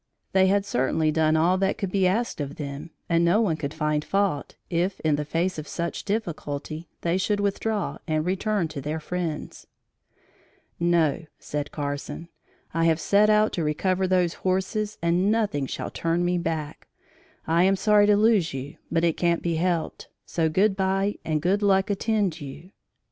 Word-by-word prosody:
They 190 Hz, 0 st, +4 dB
had 200 Hz, +1 st, +2 dB
certainly 155 Hz, 0 st, +1 dB
done 155 Hz, 0 st, +2 dB
all 175 Hz, +4 st, +3 dB
that 195 Hz, 0 st, +1 dB
could 195 Hz, -4 st, -3 dB
be 190 Hz, -1 st, +3 dB
asked 215 Hz, -2 st, -1 dB
of 145 Hz, 0 st, -5 dB
them 140 Hz, +1 st, -6 dB, 0.2 s
and 170 Hz, 0 st, +2 dB
no 170 Hz, +5 st, +4 dB
one 200 Hz, -8 st, +2 dB
could 145 Hz, -2 st, -4 dB
find 150 Hz, -1 st, -1 dB
fault 195 Hz, -7 st, -1 dB
if, 180 Hz, +3 st, -1 dB
in 155 Hz, -2 st, +2 dB
the 150 Hz, +1 st, -3 dB
face 165 Hz, +3 st, -1 dB
of 155 Hz, -, -7 dB
such 170 Hz, 0 st, -4 dB
difficulty, 160 Hz, -6 st, -4 dB
they 170 Hz, +2 st, +1 dB
should 205 Hz, +1 st, 0 dB
withdraw 205 Hz, +1 st, -1 dB
and 155 Hz, -1 st, 0 dB
return 195 Hz, 0 st, 0 dB
to 150 Hz, -3 st, -6 dB
their 150 Hz, +3 st, -3 dB
friends. 165 Hz, -1 st, -5 dB, 1.1 s
"No," 170 Hz, -2 st, +2 dB
said 145 Hz, 0 st, -4 dB
Carson, 145 Hz, +3 st, -5 dB, 0.4 s
"I 165 Hz, +1 st, +1 dB
have 165 Hz, -1 st, +3 dB
set 205 Hz, +5 st, +4 dB
out 215 Hz, 0 st, +4 dB
to 170 Hz, -, -1 dB
recover 185 Hz, +5 st, 0 dB
those 180 Hz, -2 st, +2 dB
horses 190 Hz, +3 st, -1 dB
and 175 Hz, +4 st, +2 dB
nothing 205 Hz, -12 st, 0 dB
shall -, -, -5 dB
turn 170 Hz, +1 st, 0 dB
me 180 Hz, 0 st, +1 dB
back. 160 Hz, -3 st, -4 dB, 0.6 s
I 170 Hz, +2 st, +3 dB
am 195 Hz, +1 st, +4 dB
sorry 205 Hz, +1 st, +4 dB
to 205 Hz, -1 st, +5 dB
lose 210 Hz, -8 st, +3 dB
you, 135 Hz, +2 st, -6 dB
but 165 Hz, 0 st, +1 dB
it 170 Hz, -2 st, +2 dB
can't 170 Hz, -1 st, +1 dB
be 170 Hz, -2 st, 0 dB
helped; 170 Hz, -1 st, -1 dB, 0.2 s
so 160 Hz, -2 st, 0 dB
good 195 Hz, +5 st, +2 dB
bye 195 Hz, +1 st, 0 dB
and 155 Hz, -1 st, -1 dB
good 195 Hz, +4 st, +2 dB
luck 195 Hz, 0 st, +3 dB
attend 200 Hz, -5 st, 0 dB
you." 145 Hz, +6 st, -9 dB
170 Hz, 175 wpm, -25 LUFS, 155-195 Hz, 1.1 s, to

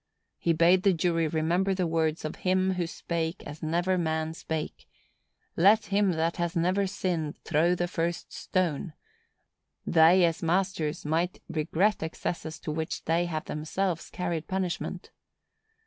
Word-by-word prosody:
He 170 Hz, -, +1 dB
bade 170 Hz, +3 st, +5 dB
the 195 Hz, 0 st, +4 dB
jury 165 Hz, -1 st, +1 dB
remember 170 Hz, +5 st, +1 dB
the 185 Hz, -1 st, 0 dB
words 160 Hz, -1 st, 0 dB
of 155 Hz, -, -4 dB
Him 185 Hz, 0 st, +1 dB
who 180 Hz, -2 st, -1 dB
spake 165 Hz, +1 st, -3 dB
as 145 Hz, +1 st, -8 dB
never 175 Hz, +4 st, +1 dB
man 160 Hz, -1 st, -1 dB
spake,—"Let 165 Hz, +5 st, -1 dB
him 200 Hz, -2 st, +2 dB
that 165 Hz, +1 st, 0 dB
has 170 Hz, 0 st, -1 dB
never 185 Hz, +4 st, +2 dB
sinned 170 Hz, -5 st, -2 dB
throw 170 Hz, +3 st, +2 dB
the 175 Hz, 0 st, -1 dB
first 170 Hz, 0 st, -3 dB
stone." 175 Hz, -3 st, -1 dB, 0.9 s
_They, 170 Hz, +3 st, +6 dB
as 165 Hz, -1 st, +1 dB
masters, 170 Hz, -3 st, 0 dB
might 165 Hz, +4 st, 0 dB
regret 170 Hz, +7 st, +1 dB
excesses 160 Hz, 0 st, -4 dB
to 155 Hz, -, -4 dB
which 160 Hz, +1 st, -4 dB
they 165 Hz, +2 st, +2 dB
have 155 Hz, -2 st, -3 dB
themselves 170 Hz, +3 st, -2 dB
carried 170 Hz, -3 st, -3 dB
punishment. 185 Hz, -2 st, -3 dB
170 Hz, 140 wpm, -28 LUFS, 160-185 Hz, 0.9 s, They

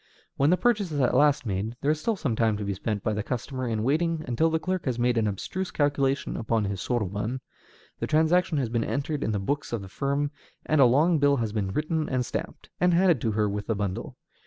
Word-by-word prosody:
When 140 Hz, +2 st, +3 dB
the 180 Hz, -, +4 dB
purchase 210 Hz, -7 st, +1 dB
is 145 Hz, -, -2 dB
at 125 Hz, -, +2 dB
last 145 Hz, -3 st, +4 dB
made, 105 Hz, +3 st, -2 dB
there 145 Hz, -, +2 dB
is 155 Hz, 0 st, -2 dB
still 225 Hz, +4 st, 0 dB
some 140 Hz, -, -2 dB
time 110 Hz, -2 st, +2 dB
to 105 Hz, -, -4 dB
be 100 Hz, -, -1 dB
spent 105 Hz, +1 st, -3 dB
by 110 Hz, -, 0 dB
the 105 Hz, -, -1 dB
customer 130 Hz, +3 st, -4 dB
in 110 Hz, -2 st, -1 dB
waiting 160 Hz, +4 st, 0 dB
until 125 Hz, +7 st, +2 dB
the 160 Hz, -, +1 dB
clerk 185 Hz, +2 st, -2 dB
has 125 Hz, -4 st, -1 dB
made 120 Hz, 0 st, +2 dB
an 110 Hz, -2 st, +2 dB
abstruse 180 Hz, -, -3 dB
calculation 140 Hz, -2 st, 0 dB
upon 115 Hz, -1 st, 0 dB
his 100 Hz, -1 st, -3 dB
soroban, 110 Hz, +1 st, -2 dB, 0.6 s
the -, -, -2 dB
transaction 160 Hz, +2 st, +3 dB
has 135 Hz, -4 st, 0 dB
been 115 Hz, 0 st, 0 dB
entered 145 Hz, +3 st, -2 dB
in -, -, 0 dB
the 105 Hz, -, 0 dB
books 140 Hz, +10 st, -2 dB
of 115 Hz, -4 st, -3 dB
the -, -, -8 dB
firm, 140 Hz, +6 st, -1 dB, 0.3 s
and 155 Hz, -2 st, +3 dB
a -, -, +8 dB
long 155 Hz, +7 st, +4 dB
bill 140 Hz, 0 st, +4 dB
has 115 Hz, -5 st, -2 dB
been 100 Hz, -3 st, -1 dB
written 155 Hz, -, -1 dB
and 130 Hz, -2 st, 0 dB
stamped, -, -, -6 dB
and 180 Hz, -1 st, +4 dB
handed 175 Hz, -7 st, +4 dB
to 110 Hz, -, 0 dB
her 105 Hz, 0 st, +1 dB
with 100 Hz, 0 st, -4 dB
the 110 Hz, -, 0 dB
bundle. 100 Hz, -2 st, -4 dB
130 Hz, 240 wpm, -26 LUFS, 110-155 Hz, 0.6 s, a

